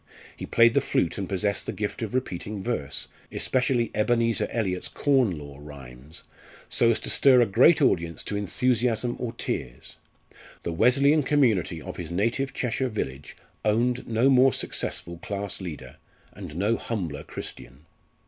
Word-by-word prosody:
He - - -7
played 115 0 +5
the - - +3
flute 85 - 0
and 95 - -4
possessed 100 +1 -1
the - - -1
gift 105 +2 -4
of 115 +2 -4
repeating 105 -4 -3
verse 95 - -2 0.2
especially 125 -2 0
Ebenezer 115 +1 +2
Eliot's 95 -6 -2
Corn 130 - +1
Law 70 -1 -10
Rhymes 70 +1 -10 0.4
so 115 - +3
as 115 - +3
to - - -3
stir 130 -2 +6
a 120 - +5
great 130 - +5
audience 85 -9 +1
to 105 - -4
enthusiasm 120 +3 0
or 120 -2 -3
tears. 65 - -5 0.7
The 85 - -3
Wesleyan 140 - +4
community 115 - +2
of - - -8
his 80 - -6
native 115 +9 0
Cheshire 125 +1 -1
village 70 - -5 0.3
owned 120 +3 +1
no 120 +4 +3
more 130 0 +5
successful 85 0 -3
class 100 +1 -5
leader, 85 -5 -8 0.4
and 75 - -9
no 105 +6 +1
humbler 85 -11 -4
Christian. 65 +5 -9
110 Hz, 150 wpm, -26 LUFS, 85-125 Hz, 0.7 s, stir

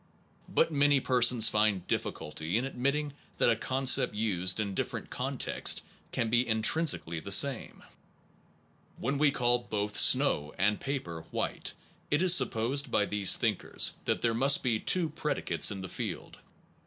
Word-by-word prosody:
But - - +1
many 145 -1 +2
persons 125 -3 +3
find 105 -4 0
difficulty 80 +5 -4
in 125 - -2
admitting 140 +2 -3 0.2
that - - +3
a - - +1
concept 130 +1 +1
used 95 -3 -1
in 100 -2 -3
different - - -5
contexts - - -1 0.3
can 115 - -2
be 120 +1 +1
intrinsically 110 - +1
the 100 - -8
same. 135 +4 +2 1.1
When 135 +3 -3
we 150 -1 +4
call 120 -2 0
both 105 -3 -5
snow 75 0 +3
and 105 +2 0
paper 85 - -5
white - - -4 0.4
it 145 +4 +1
is 180 -2 +6
supposed 130 0 +1
by 105 - +1
these 105 -2 +3
thinkers - - -1
that - - -2
there 115 -1 +1
must 135 +4 +3
be 115 -4 0
two 180 +6 +1
predicates 155 0 -1
in 100 -2 -5
the 95 - -7
field. - - -7
120 Hz, 150 wpm, -29 LUFS, 105-140 Hz, 1.1 s, is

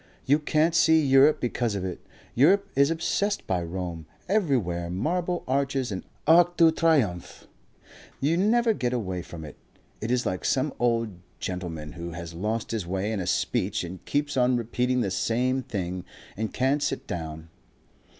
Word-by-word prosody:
You 145 +3 +4
can't 155 +2 +2
see 160 -1 +5
Europe 140 +1 +5
because 120 -3 -1
of 95 -2 -3
it. 90 -2 -6 0.3
Europe 195 +10 +4
is 140 +1 +4
obsessed 185 +5 -1
by 90 -2 0
Rome. 85 -2 -5 0.2
Everywhere 125 - 0
Marble 170 - -1
Arches 135 -2 0
and 95 - -4 0.2
ARCS 175 +2 +6
DE 165 -2 +6
TRIOMPHE. 140 - 0 0.7
You 150 +5 +2
never 225 +5 +3
get 125 - -1
away 95 -7 -2
from 85 -2 -9
it. 75 - -11 0.4
It 110 - -3
is 125 0 +1
like 90 - -2
some 135 +2 +1
old 115 -6 0 0.2
gentleman 85 -5 -5
who 85 +2 -7
has 85 0 -7
lost 105 +6 -2
his 110 -6 -3
way 95 +4 -1
in 110 - -2
a 90 - -3
speech - - 0
and 90 +1 -8
keeps 145 0 -1
on 125 -1 +3
repeating 125 +2 0
the 100 - -1
same 125 +6 0
thing. 90 -6 -4 0.3
And 110 +1 -3
can't 135 +3 +1
sit 145 - -2
down. 80 -1 -6
120 Hz, 165 wpm, -26 LUFS, 90-150 Hz, 0.7 s, ARCS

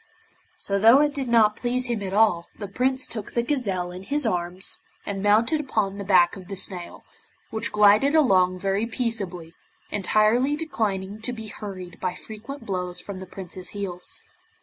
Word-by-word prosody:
So, 200 0 -1
though 230 +6 +7
it 295 -1 +2
did 275 -2 -2
not 220 -3 +4
please 250 +1 0
him 235 -4 -1
at 190 -2 -4
all, 195 -5 +3
the 205 - -5
Prince 260 +6 0
took 215 -3 -6
the 235 - +1
gazelle 200 -10 -1
in 180 +1 -8
his 285 +8 -1
arms, 180 -2 -1 0.3
and 195 -1 -3
mounted 220 +9 +3
upon 205 -8 -1
the - - -3
back 180 -3 +4
of 185 -2 -11
the 200 - -5
snail, 180 -2 -2 0.5
which 220 - -2
glided 210 +8 +5
along 185 -11 +4
very 195 +4 0
peaceably, 200 -9 -3 0.4
entirely 215 +7 +3
declining 210 -10 -2
to 245 - -2
be 220 -2 -7
hurried 190 -4 -8
by 180 -1 -2
frequent 230 +4 -9
blows 180 -2 -3
from 200 -2 -7
the 190 - -8
Prince's 185 0 -7
heels. 180 -3 -5
205 Hz, 170 wpm, -25 LUFS, 185-235 Hz, 0.5 s, though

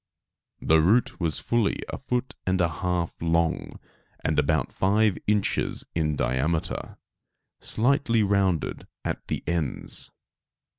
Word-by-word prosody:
The 80 0 +4
root 105 +9 +3
was 80 -6 0
fully 120 -3 0
a - - -5
foot 125 -1 -2
and 95 0 +2
a 90 - +4
half 90 0 -1
long, 85 0 0 0.4
and 75 -1 +1
about 75 -2 +1
five 105 +1 +3
inches 105 -1 +1
in 75 -2 0
diameter, 75 +5 -1 0.6
slightly 120 -2 +2
rounded 95 -4 +1 0.2
at - - -3
the - - -3
ends. 85 -4 -3
90 Hz, 115 wpm, -26 LUFS, 80-105 Hz, 0.6 s, The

